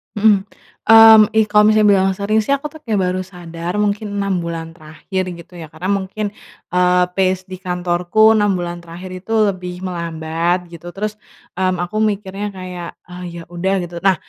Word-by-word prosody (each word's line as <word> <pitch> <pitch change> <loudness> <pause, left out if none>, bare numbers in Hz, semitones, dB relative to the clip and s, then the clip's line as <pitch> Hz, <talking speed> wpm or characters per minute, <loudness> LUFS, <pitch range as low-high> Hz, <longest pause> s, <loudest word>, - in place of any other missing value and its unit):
Mhm, 205 -2 +3 0.4
mmm, 225 -1 +9
ih 220 - +5
kalau 210 0 +6
misalnya 215 -1 +4
bilang 190 -1 +3
sering 210 +2 +1
sih, 275 +6 +1
aku 295 +1 -6
tuh 315 - -12
kayak 210 -3 +1
baru 180 +1 -1
sadar 175 -1 -6
mungkin 205 0 -2
6 200 -2 0
bulan 165 -1 -5
terakhir 175 +4 -5 0.2
gitu 175 -1 -14
ya. 160 - -8
Karena 175 +6 -4
mungkin, 200 +1 -2 0.4
eee, 180 0 +3
phase 185 0 0
di 185 - -7
kantorku 180 +4 +2
6 205 -3 +2
bulan 175 -1 -4
terakhir 170 +2 -10
itu 185 +5 -6 0.2
lebih 180 0 -8
melambat 170 0 -2
gitu, 170 +1 -11
terus, 215 +1 -4 0.4
mmm, 185 -1 0
aku 215 +5 -3
mikirnya 205 -1 -1
kayak, 180 -2 -7
"Ah 180 0 -9
ya 170 -1 -8
udah," 190 +3 -1
gitu. 175 0 -7
Nah, 190 0 +3
185 Hz, 175 wpm, -18 LUFS, 175-205 Hz, 0.4 s, mmm